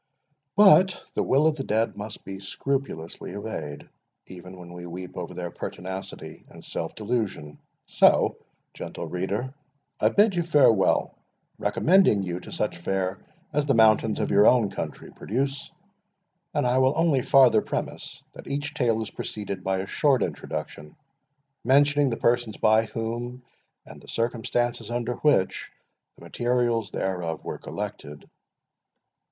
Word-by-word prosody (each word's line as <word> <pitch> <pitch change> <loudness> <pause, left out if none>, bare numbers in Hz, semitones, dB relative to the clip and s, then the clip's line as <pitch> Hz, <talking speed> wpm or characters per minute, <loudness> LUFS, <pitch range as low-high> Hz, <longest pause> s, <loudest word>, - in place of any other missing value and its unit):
But 190 -2 +6
the - - 0
will 140 +4 +3
of 160 -1 +2
the 135 - -3
dead 110 0 0
must 105 +1 -8
be 95 0 -7
scrupulously 100 -5 -4
obeyed, 90 -9 -6 0.4
even 90 0 -11
when 90 -1 -11
we 90 0 -8
weep 90 +1 -8
over 90 -2 -6
their 90 -1 -5
pertinacity 95 +3 -7
and - - -13
self 80 - -4
delusion. 105 -10 -3 0.3
So, - - +4 0.4
gentle - - -6
reader, 100 - -3 0.5
I - - +4
bid 205 0 +4
you 175 - +1
farewell, 145 - +3 0.5
recommending 175 - +3
you 90 -1 -3
to - - -12
such 105 - -2
fare 95 +2 -2 0.3
as 145 0 0
the 135 - +3
mountains 110 -1 +4
of - - -1
your 100 +1 +6
own 115 -6 +4
country - - -6
produce; 135 +5 -3 0.8
and - - 0
I 125 +1 +3
will 130 +1 +3
only 160 -5 +3
farther 125 -5 +5
premise, - - -5
that - - -12
each 145 +1 -3
Tale 115 -6 +1
is - - -8
preceded 100 -3 -5
by 95 0 0
a - - -5
short 135 +2 +2
introduction, 75 0 -6 0.7
mentioning 145 +2 +4
the 115 - -2
persons 120 -2 +1
by 110 +1 +4
whom, 120 +3 -5 0.4
and - - -13
the - - -17
circumstances 120 +1 -1
under 120 0 -2
which, 145 -11 +1 0.5
the - - -15
materials 120 -3 0
thereof 90 -4 -3
were - - -5
collected. 75 0 -7
115 Hz, 145 wpm, -25 LUFS, 95-130 Hz, 0.8 s, But